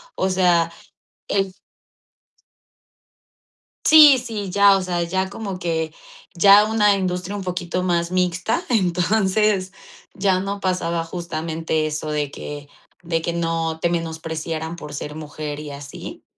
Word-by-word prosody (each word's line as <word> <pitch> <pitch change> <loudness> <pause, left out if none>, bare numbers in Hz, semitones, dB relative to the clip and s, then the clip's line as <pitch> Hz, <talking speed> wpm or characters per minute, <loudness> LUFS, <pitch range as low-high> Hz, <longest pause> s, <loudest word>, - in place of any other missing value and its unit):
o 190 - 0
sea, 175 -3 +3 0.6
el 195 -1 0 2.3
Sí, 300 -4 +9
sí, 220 -5 -5
ya, 200 +1 +5
o 190 - -1
sea, 175 -1 -1
ya 190 +2 -1
como 200 -3 -5
que 160 -2 -2 0.4
ya 200 +4 +7
una 210 -2 +3
industria 185 +1 -3
un 195 - -5
poquito 180 0 -3
más 170 -1 0
mixta, 185 - 0
entonces 195 0 +1 0.4
ya 190 -2 +1
no 200 +1 -4
pasaba 170 -3 -1
justamente 165 -2 -3
eso 155 0 -4
de 150 -2 -1
que 145 0 -8 0.3
de 165 -1 -1
que 170 - -2
no 165 -1 -1
te 170 - +1
menospreciaran 160 -1 -4
por 150 -3 -9
ser 150 +1 -6
mujer 150 -1 -6
y 150 -1 -7
así. 140 0 -9
175 Hz, 130 wpm, -21 LUFS, 160-195 Hz, 2.3 s, Sí